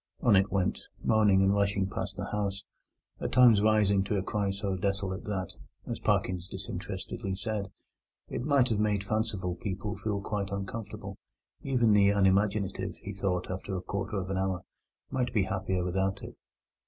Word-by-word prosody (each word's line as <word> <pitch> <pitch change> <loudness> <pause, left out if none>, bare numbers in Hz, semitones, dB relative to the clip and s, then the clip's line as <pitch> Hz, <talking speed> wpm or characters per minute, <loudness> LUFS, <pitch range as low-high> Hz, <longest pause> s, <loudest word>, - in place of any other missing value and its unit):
On 110 - +5
it 95 +1 +3
went, 95 -1 0 0.2
moaning 105 -3 +4
and 95 +1 +4
rushing 100 -1 +1
past - - -4
the - - -4
house, 100 -1 -2 0.6
at - - -3
times 120 -5 +7
rising 105 -2 +4
to 105 +1 0
a 95 - 0
cry 100 0 -1
so 100 0 -2
desolate 100 0 -2
that, 95 -4 -3 0.3
as - - -4
Parkins 90 -1 0
disinterestedly 95 +2 -5
said, 105 0 -3 0.6
it - - -4
might 140 -3 +3
have 110 -3 +1
made 105 -2 +1
fanciful 105 -4 -1
people 100 +3 -4
feel 105 -2 -2
quite 100 0 -3
uncomfortable; 100 +2 -5 0.4
even 120 -5 +3
the 100 -1 +6
unimaginative, 100 0 +1
he - - -7
thought 90 -2 -1
after 95 +1 -4
a 90 - -2
quarter 100 +2 -3
of 95 0 -3
an 95 - 0
hour, 95 -2 -1 0.5
might 125 -1 0
be 105 - +4
happier 95 -1 -1
without 95 +2 -1
it. - - -8
100 Hz, 165 wpm, -30 LUFS, 95-105 Hz, 0.6 s, times